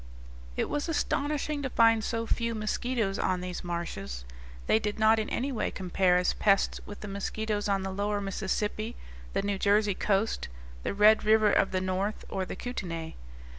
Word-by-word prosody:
It - - +1
was 295 +3 -2
astonishing 295 -1 -1
to 270 - -2
find 225 -2 +4
so 230 0 -1
few 230 0 -1
mosquitoes 215 -1 -1
on 185 -1 +1
these 180 0 -5
marshes. 115 - -4 0.4
They 220 - +4
did 210 -1 -3
not 220 0 +5
in 215 - -2
any 270 +3 -1
way 235 - -1
compare 185 -1 +2
as 180 - +2
pests 200 -2 +2
with 205 - -9
the 210 - -6
mosquitoes 205 +1 -2
on 195 -1 +1
the 190 - -3
lower 205 +2 -1
Mississippi, 210 +3 -2 0.4
the - - 0
New 200 -1 -1
Jersey 205 0 +3
coast, 200 +3 0 0.3
the - - -3
Red 210 +2 +6
River 215 -1 +5
of 195 - +3
the 185 0 -1
North, 185 +3 -2
or 190 -1 -2
the - - -6
Kootenay. 170 -9 -5
205 Hz, 175 wpm, -29 LUFS, 190-220 Hz, 0.4 s, Red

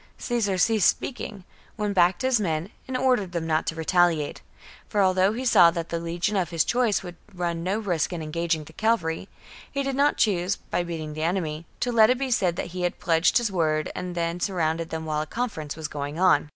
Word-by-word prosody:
Caesar 220 -6 -1
ceased 215 +2 +4
speaking, 210 -6 -4 0.3
went 210 -2 -1
back 175 -1 +4
to - - -4
his 260 -3 +3
men, 170 -1 -2 0.2
and 260 -1 -2
ordered 250 -8 +1
them 170 -2 -2
not 160 -1 0
to 165 - -1
retaliate; 165 -2 +1 0.5
for 210 - -1
although 185 +1 +3
he 250 +3 -4
saw 180 -8 +7
that 170 -1 -4
the 170 - -2
legion 170 +4 -2
of 180 -4 0
his 165 -2 +2
choice 240 -5 +1
would 175 -2 -9 0.2
run 170 -2 -2
no 185 +4 -1
risk 185 -8 -1
in 170 -3 -4
engaging 165 0 -1
the 160 - -14
cavalry, 190 -4 0 0.4
he 280 -1 -1
did 270 -1 -2
not 285 +2 +3
choose, 190 -2 +2
by - - -3
beating 160 -3 -5
the 155 - -5
enemy, 165 -2 -2
to 245 - 0
let 220 -2 +6
it 250 - +3
be 265 0 -2
said 180 -7 +2
that 175 - -4
he 180 - -4
had 175 0 -1
pledged 165 0 +3
his 235 -4 0
word 155 -4 0
and 180 -1 -5
then 170 0 -1
surrounded 165 -3 -1
them 160 0 -4
while 155 -1 -1
a 155 - -5
conference 185 -9 -4
was 160 -1 -4
going 145 +2 -5
on. 180 -6 +4
175 Hz, 220 wpm, -25 LUFS, 165-210 Hz, 0.5 s, saw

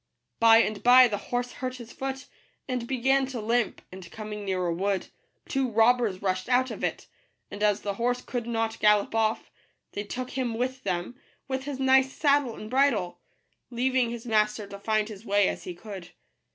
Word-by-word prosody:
By 230 0 +7
and 210 -2 -3
by 250 +1 +8
the 210 -3 -2
horse 245 0 -1
hurt 255 0 -5
his 235 -2 -11
foot, 270 0 -5 0.4
and 250 -3 -3
began 265 +1 +2
to 255 -3 -5
limp; 230 0 0
and, 185 -2 -10
coming 210 -1 -7
near 185 -2 -1
a 170 - 0
wood, 195 +1 -1 0.4
two 270 -2 0
robbers 225 -3 +2
rushed 185 +2 -1
out 255 +1 +2
of - - -7
it; - - -2 0.5
and 205 - -7
as 210 -1 +2
the 200 - -2
horse 245 +4 0
could 240 -2 -4
not 225 -1 -2
gallop 210 -1 +3
off, 225 0 0 0.4
they 205 - -4
took 250 +4 -5
him 250 -4 -2
with 255 +2 -2
them, 185 +5 -3 0.3
with 265 -1 -3
his 285 -2 -5
nice 265 0 +4
saddle 285 -5 +2
and 215 - -8
bridle, 255 -10 +1 0.5
leaving 255 0 +1
his 235 0 -7
master 215 -2 +1
to 200 0 -10
find 215 0 0
his 215 -2 -10
way 205 -2 +3
as - - -4
he 180 - -6
could. 190 -2 -9
230 Hz, 190 wpm, -27 LUFS, 205-255 Hz, 0.5 s, by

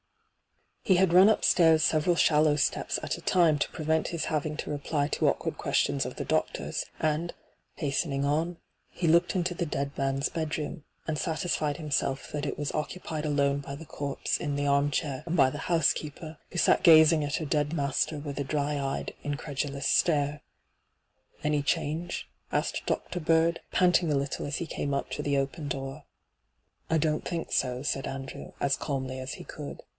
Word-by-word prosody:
He 190 - +4
had 180 -1 +3
ran 185 +4 +8
upstairs 160 -6 +4
several 160 +3 +3
shallow 150 -2 +4
steps 150 - 0
at - - -1
a - - -10
time 165 -5 +3
to - - 0
prevent 160 0 0
hla 170 -2 -3
having 155 0 -2
to - - -4
reply 145 0 -1
to - - +2
awkward - - -3
questions - - +1
of - - -7
the - - -4
doctor's, - - -1
and, 155 +2 -1 0.4
hastening 140 -1 -1
on, 160 +4 0 0.3
he 175 - -2
looked 170 +3 +4
into 180 -1 0
the 170 -1 -2
dead 140 -1 -3
man's 135 0 0
bedroom, 155 -2 -4 0.2
and 155 -2 -2
satisfied 155 -3 -1
himself 140 -3 -1
that 150 -1 -3
it - - -3
was 145 -1 -2
occupied 155 0 -3
alone 140 -1 +1
by 140 0 -7
the 165 +3 -10
corpse 140 -1 -2
in 145 -3 -2
the 145 0 -1
armchair 140 0 +1
and 170 +1 -1
by 135 -2 +5
the - - -6
housekeeper, 155 -1 0
who - - -6
sat - - +4
gazing 160 -1 +7
at 145 0 -1
her 160 - -2
dead 150 +1 0
master 145 0 0
with 145 -1 -5
a - - 0
dry 145 +1 -1
eyed, 135 0 -3
incredulous 145 -1 -3
stare. 145 -3 +2 0.5
' - - -33
Any 150 -1 +1
change 160 +4 -2 0.2
V - - +1
asked - - -2
Dr. 180 - -2
Bird, 165 +1 +2
panting 180 -3 +3
a - - +2
little 140 +1 -2
as 145 - -3
he 170 - -3
came 140 -3 -2
up - - -3
to - - -3
the 145 -1 0
open 140 +3 -2
door. 135 +1 -5 0.4
' - - -45
I 160 - +3
don't 155 0 0
think 170 -2 -4
so,' 125 0 0
said 135 -2 -1
Andrew, 135 0 -7
as 140 -1 +2
calmly 130 -2 -3
as 130 +1 -5
he - - -9
could. 150 -3 -8
150 Hz, 185 wpm, -28 LUFS, 140-160 Hz, 0.5 s, ran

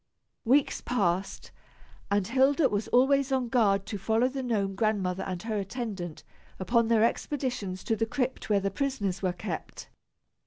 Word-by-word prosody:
Weeks 270 +4 +3
passed 195 -5 -1 0.6
and 200 -1 +1
Hilda 270 - +3
was 205 +1 -1
always 270 +2 +3
on 260 -3 0
guard 200 -5 +2
to 210 -2 -5
follow 225 +5 +2
the 265 +1 -4
Gnome 210 -6 -1
Grandmother 195 -3 0
and 185 -2 -4
her 220 -2 -2
attendant 195 -5 -5 0.3
upon 230 +4 +2
their 225 -1 +4
expeditions 235 -7 -2
to 225 - 0
the 225 +1 -1
crypt 255 0 -2
where 205 -1 +4
the 195 0 -2
prisoners 205 -6 -2
were 185 -2 +1
kept. 175 -2 -6
220 Hz, 155 wpm, -28 LUFS, 195-250 Hz, 0.6 s, their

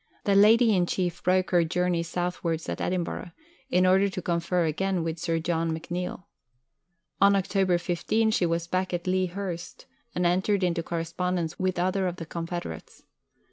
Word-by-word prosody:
The 200 - +2
Lady 220 +2 +6
in 175 -1 +2
Chief 175 -2 -2
broke 185 +1 +2
her 175 -2 +4
journey 180 +1 0
southwards 170 -1 -2
at - - -4
Edinburgh, 175 -1 -3 0.4
in 185 -7 +3
order 190 +2 +4
to 185 - -5
confer 170 0 0
again 180 +3 0
with 165 0 -3
Sir 165 0 0
John 165 0 -1
McNeill. 180 +2 -5 1.0
On 200 0 +6
October 190 -2 +2
15 205 +6 0
she 180 -4 +2
was 165 0 -1
back 185 +1 -1
at 175 - -5
Lea 185 0 +1
Hurst, 180 -2 -6 0.3
and 180 - 0
entered 190 +3 +2
into 175 -1 +1
correspondence 170 0 -2
with 185 -1 0
other 185 +2 +1
of 180 - -3
the 165 - -7
confederates. 165 - -6
180 Hz, 165 wpm, -27 LUFS, 170-185 Hz, 1.0 s, Lady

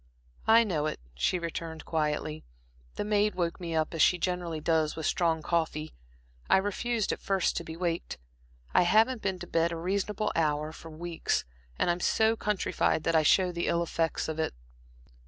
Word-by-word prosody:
"I 230 +1 +7
know 160 -8 -1
it," - - -4
she 60 - +1
returned, 165 -1 -5
quietly. 155 -1 -1 0.5
"The - - -2
maid 210 0 +2
woke 170 -2 -1
me 165 -2 -3
up, 155 +1 0
as 165 - 0
she 180 - +5
generally 175 -2 -2
does, 160 -1 +1
with 160 - -4
strong 165 -3 +1
coffee. 160 -2 -1 0.6
I - - +6
refused 210 +3 -1
at - - -4
first 195 -2 +1
to - - -2
be 160 0 -8
waked. 170 -1 -2 0.6
I - - +6
haven't 220 +7 +3
been 190 -2 -1
to 175 - -7
bed 165 -1 +1
at 170 - -1
a - - -4
reasonable 200 +4 -1
hour 155 -1 +1
for 165 +1 -11
weeks, 165 +1 -2 0.3
and - - +2
I'm 175 - -2
so 220 +5 +3
countrified 210 -6 0
that 165 - +1
I 160 - +6
show 180 +4 +4
the 170 0 -2
ill 170 0 +2
effects 165 -1 -1
of 160 0 -4
it." 160 - -1
170 Hz, 190 wpm, -29 LUFS, 160-190 Hz, 0.6 s, I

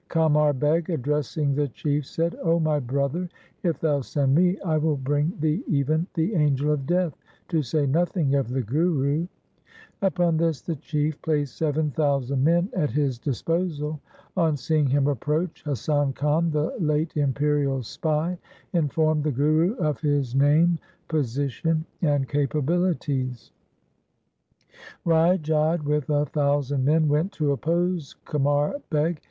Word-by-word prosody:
Oamar 150 -2 +3
Beg 155 +5 +1
addressing 150 -1 -1
the 145 +1 0
Chief 145 +2 -2
said, 165 +1 -1
' - - -6
O 165 -1 +2
my 155 -2 +1
brother, 140 +7 -2 0.3
if 170 -3 0
thou 145 -3 +1
send 135 0 0
me, 180 +4 +3
I 160 -5 0
will 150 -1 +1
bring 145 +4 0
thee 155 - 0
even 155 +4 +1
the 170 +5 0
angel 150 -3 +2
of 140 -3 -2
Death, 175 -4 +1 0.3
to 165 -3 +1
say 145 +2 0
nothing 160 0 +1
of 140 -3 +1
the 130 +1 -1
Guru? 150 - 0 0.4
' 445 - -25
Upon 175 -4 +2
this 165 -3 0
the 165 - -3
Chief 150 +1 -2
placed 145 -5 -1
seven 150 -1 0
thousand 140 -2 0
men 170 +5 +3
at 155 -6 0
his 140 -5 -1
disposal. 155 - -2 0.4
On 165 -5 +2
seeing 150 +2 +1
him 135 +1 +2
approach, 150 +5 -1
Hasan 145 0 0
Khan, 150 +5 +1
the 150 0 -1
late 155 0 0
imperial 145 -2 +1
spy, 160 +8 -2 0.3
informed 155 -2 +1
the 150 - 0
Guru 155 - +2
of 150 - -1
his 145 -4 0
name, 155 +5 +4 0.3
position, 145 +2 -1 0.2
and 145 -5 +1
capabilities. 145 - -1 1.5
Rai 165 +2 +4
Jodh 155 0 0
with 150 -1 -1
a 145 0 +2
thousand 145 -2 0
men 155 +2 +3
went 155 +6 +1
to 150 -5 0
oppose 170 +3 -1
Qamar 145 - 0
Beg. 155 +1 0
150 Hz, 145 wpm, -25 LUFS, 140-165 Hz, 1.5 s, name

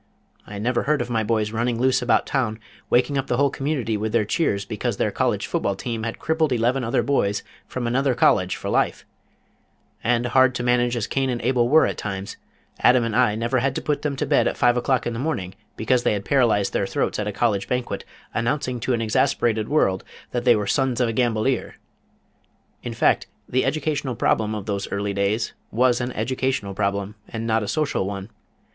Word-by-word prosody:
I 100 - -7
never 120 +4 0
heard 150 -1 +3
of 120 0 -3
my 115 -1 +1
boys 110 -1 0
running 115 +1 -1
loose 130 +1 +3
about 125 - +2
town 115 -5 -1 0.3
waking 135 +3 +2
up 135 - -3
the 120 - 0
whole 140 0 +3
community 135 -7 -1
with 110 +1 -3
their 115 -3 +3
cheers 100 - 0
because - - -3
their - - 0
college - - 0
football 100 - -1
team 115 +3 -4
had 115 0 -4
crippled 160 -2 0
eleven 125 +2 +1
other 115 - +1
boys 105 -8 0 0.2
from 130 -1 -4
another 130 +2 +1
college 95 -5 +3
for - - -7
life; - - 0 1.0
and 120 +1 +1
hard 130 +1 +4
to 120 - -2
manage 120 0 +2
as 110 - -1
Cain 135 -1 -1
and 120 -1 -1
Abel 120 -1 +2
were 160 +3 +6
at - - -3
times, 95 -1 -5 0.4
Adam 125 -1 +5
and 115 -2 -2
I 105 - +3
never 115 +3 0
had 135 +2 0
to - - -2
put 150 - -1
them 145 -2 -2
to 150 - -2
bed 145 0 +3
at - - -2
five 120 0 +4
o'clock 125 +1 +1
in 120 - -2
the 115 - -4
morning 110 - -2 0.2
because 120 +3 +2
they - - +2
had 100 -1 -3
paralyzed 120 -7 +2
their - - 0
throats - - -1
at 105 - -2
a - - -1
college 100 -1 0
banquet 125 -1 -2 0.3
announcing 125 +1 -1
to 125 +2 -1
an 115 - -2
exasperated 110 -1 +1
world 95 -11 +2 0.3
that 120 0 -2
they 120 -2 +6
were 105 -1 -1
Sons 130 +2 +1
of 125 -2 +2
a - - -2
Gambolier. 120 +1 0 1.1
In - - -6
fact, - - +2 0.2
the 130 +1 +1
educational 145 -2 -1
problem 110 -1 +1
of 105 -2 -5
those 100 -2 -3
early 100 0 -2
days 100 +3 0 0.2
was 120 +1 +2
an 125 +1 -2
educational 125 -3 -1
problem 100 0 -1 0.2
and 115 0 -4
not 110 0 +1
a 105 - -4
social 145 -8 0
one. 100 +1 -6
120 Hz, 210 wpm, -23 LUFS, 105-130 Hz, 1.1 s, were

